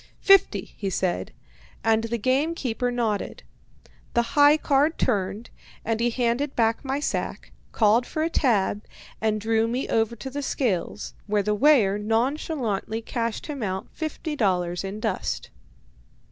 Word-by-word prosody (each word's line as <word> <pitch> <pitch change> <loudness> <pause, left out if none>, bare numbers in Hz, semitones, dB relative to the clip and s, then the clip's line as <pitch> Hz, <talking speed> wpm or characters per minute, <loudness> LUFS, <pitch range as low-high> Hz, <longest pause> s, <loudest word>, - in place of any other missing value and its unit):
"Fifty," 370 - +4
he 200 - -3
said, 185 -1 -1 0.5
and 225 0 +2
the 235 +1 -2
game 270 +8 +1
keeper 245 -3 -1
nodded. 230 -4 -2 0.7
The 235 - +5
"high 290 +1 +6
card" 295 +1 +2
turned, 210 0 -1 0.3
and 225 0 0
he 240 +1 +2
handed 245 +4 0
back 225 -1 +1
my 270 +1 -1
sack, 295 - -3 0.2
called 225 +2 +3
for 310 - -2
a 325 - +1
"tab," 210 -7 +1 0.4
and 215 -1 +1
drew 225 +1 +1
me 245 +4 -2
over 225 +1 +1
to 250 +4 -7
the 285 +2 -3
scales, 215 -8 -2
where 205 -1 +1
the 210 +1 +1
weigher 210 -5 +4
nonchalantly 225 -1 -1
cashed 230 -1 -3
him 290 -4 -5
out 190 -2 -3
fifty 310 -1 -4
dollars 180 -7 0
in 195 +2 -5
dust. 215 - -3
230 Hz, 145 wpm, -25 LUFS, 210-270 Hz, 0.7 s, high